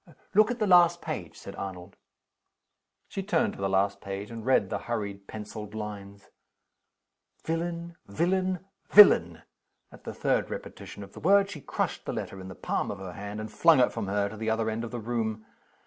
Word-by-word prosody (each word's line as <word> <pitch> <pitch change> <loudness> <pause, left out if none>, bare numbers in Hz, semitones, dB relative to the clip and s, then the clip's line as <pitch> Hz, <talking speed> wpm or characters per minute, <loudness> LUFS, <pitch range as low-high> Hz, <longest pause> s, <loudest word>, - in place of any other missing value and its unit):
"Look 215 +1 +5
at 245 - -2
the 215 - +1
last 175 -2 +6
page," - - -6
said - - -9
Arnold. 95 -1 -7 1.1
She 195 - -4
turned 185 -4 +1
to - - -12
the 95 - 0
last 100 +1 +1
page, 100 +2 -6
and 115 -1 -7
read 120 -6 +2
the - - -1
hurried 100 -4 -4
penciled 105 0 -8
lines. 100 -2 -7 1.1
"Villain! 170 +1 -3
villain! 185 - 0 0.2
villain!" 85 - +7 0.5
At - - -15
the - - -6
third - - 0
repetition 100 - -8
of 100 - -13
the - - -10
word, 200 +2 +4
she 155 -7 -8
crushed - - -3
the - - -3
letter 95 - -5
in 95 - -8
the 95 - -9
palm - - -2
of 105 - -4
her 95 -2 -7
hand, 100 +1 -6
and 110 0 -6
flung 160 +7 +5
it 125 - +3
from 115 -4 -3
her 100 +1 +1
to 105 +2 -8
the 110 +1 -2
other 110 0 0
end 110 +1 -3
of 120 - -4
the 120 - -5
room. 110 -1 -3
110 Hz, 195 wpm, -28 LUFS, 100-170 Hz, 1.1 s, villain